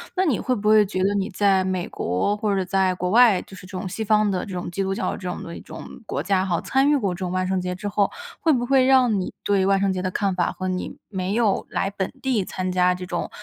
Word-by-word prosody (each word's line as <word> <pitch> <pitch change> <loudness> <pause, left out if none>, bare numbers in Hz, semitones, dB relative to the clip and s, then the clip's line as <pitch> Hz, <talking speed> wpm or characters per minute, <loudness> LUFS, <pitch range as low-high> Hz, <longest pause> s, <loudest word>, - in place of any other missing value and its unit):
那 375 0 +2
你 285 -10 +1
会 255 - 0
不 210 -2 -3
会 215 0 +6
觉 190 -1 -4
得 200 +1 +2
你 195 -1 -1
在 195 0 +2
美 185 -1 -2
国 90 - -1
或 210 -1 0
者 190 -1 0
在 190 0 +1
国 180 0 -2
外， 225 -4 +6
就 195 - -13
是 185 - -12
这 185 0 -7
种 185 - -4
西 200 +4 -4
方 215 -1 +3
的 185 - -1
这 195 - -7
种 180 -1 -4
基 195 - -3
督 195 0 -1
教 - - -1
这 185 - -6
种 - - -5
的 170 - -7
一 - - -9
种 - - -10 0.2
国 - - -2
家 185 -1 +1
哈， 175 -3 0
参 270 +2 +2
与 295 - +4
过 200 -8 -1
这 175 - -9
种 185 -2 -3
万 185 0 -1
圣 190 0 0
节 180 0 -3
之 205 +3 -5
后， 200 0 +1 0.3
会 325 - +3
不 245 -4 +1
会 265 +1 +4
让 255 -5 +4
你 - - -4
对 200 -2 +2
万 195 0 +3
圣 195 -1 +1
节 185 - -3
的 185 - -1
看 195 +1 0
法 180 - +1
和 185 - -5
你 185 0 -4
没 190 0 -2
有 225 -4 +1
来 195 - -1
本 190 -2 -3
地 255 -7 +1
参 185 0 -3
加 180 0 +3
这 180 0 -7
种 175 -1 -3
195 Hz, 310 characters per minute, -23 LUFS, 185-210 Hz, 0.3 s, 会